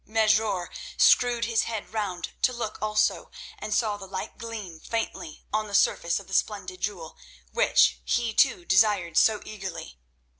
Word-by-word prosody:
Mesrour 215 -4 +1 0.3
screwed 240 -1 +4
his 230 -1 +1
head 220 -2 -5
round 195 -5 -3
to 255 - +3
look 235 -3 -5
also, 215 0 +1 0.3
and 215 - -6
saw 210 -1 +1
the 195 -1 -10
light 190 0 -6
gleam 215 -8 -7
faintly 225 -8 -5
on 215 0 0
the 200 - -4
surface 170 -1 +2
of 200 - -12
the 195 - -10
splendid 185 -3 -1
jewel, 180 -6 -4 0.4
which - - +3
he, 235 -2 0
too, 175 - +3
desired 190 -4 +3
so 215 +3 +4
eagerly. 190 - -7
210 Hz, 155 wpm, -26 LUFS, 185-220 Hz, 0.4 s, screwed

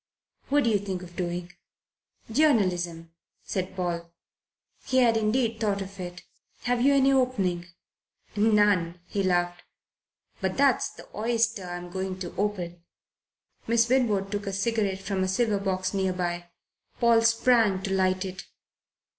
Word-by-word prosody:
"What 290 +1 +3
do 230 - +2
you 205 - +3
think 190 -2 -4
of 175 -1 -12
doing?" 175 0 -4 0.8
"Journalism," 180 - +1 0.3
said 185 0 -3
Paul. 170 -2 -3 0.7
He 260 - 0
had 240 -3 +5
indeed 225 +1 +1
thought 205 -3 0
of 195 0 -8
it. 180 0 -7 0.4
"Have 245 -1 +1
you 280 +2 +5
any 275 0 +4
opening?" 195 -10 +1 0.7
"None," 205 -5 +3
he 200 - -2
laughed. 175 -1 0 0.8
"But 190 -1 -1
that's 275 -3 +3
the - - -14
oyster 225 -2 0
I'm 175 0 -6
going 190 0 -3
to 175 - -6
open." 180 -4 -3 0.8
Miss 230 0 +3
Winwood 215 -7 +2
took 205 0 -3
a 195 - -2
cigarette 195 -1 0
from 190 -1 -1
a - - 0
silver 205 +2 +1
box 185 -1 -1
near 190 -1 0
by. 175 -1 -3 0.5
Paul 235 -1 +5
sprang 230 -4 +3
to 195 - -2
light 185 0 +1
it. 190 0 -7
195 Hz, 145 wpm, -27 LUFS, 180-225 Hz, 0.8 s, had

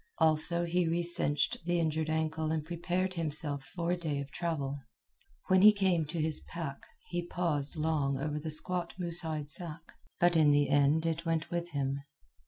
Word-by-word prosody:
Also, 160 +1 +4
he 175 0 +1
recinched 165 -4 +1
the 175 0 +1
injured 160 -1 0
ankle 160 0 -1
and 155 -2 -1
prepared 175 +2 -1
himself 150 -4 -2
for 170 +1 -3
a - - +3
day 155 -5 -2
of 140 0 -6
travel. 145 -4 -2 0.7
When 185 0 +5
he 210 +2 +10
came 190 -6 +1
to 165 +3 -4
his 155 0 -1
pack, 160 -5 -6 0.3
he 175 0 -3
paused 160 -5 -1
long 150 -3 0
over 150 +2 -2
the 155 +1 -5
squat 175 +3 -2
moose 175 -2 0
hide 155 -3 -4
sack, 165 -1 -6 0.3
but 175 0 +4
in 155 -2 +5
the 145 -1 +3
end 145 +3 +3
it 165 +1 -1
went 165 -1 -1
with 175 0 -2
him. 140 -1 -1
160 Hz, 180 wpm, -31 LUFS, 150-175 Hz, 0.7 s, he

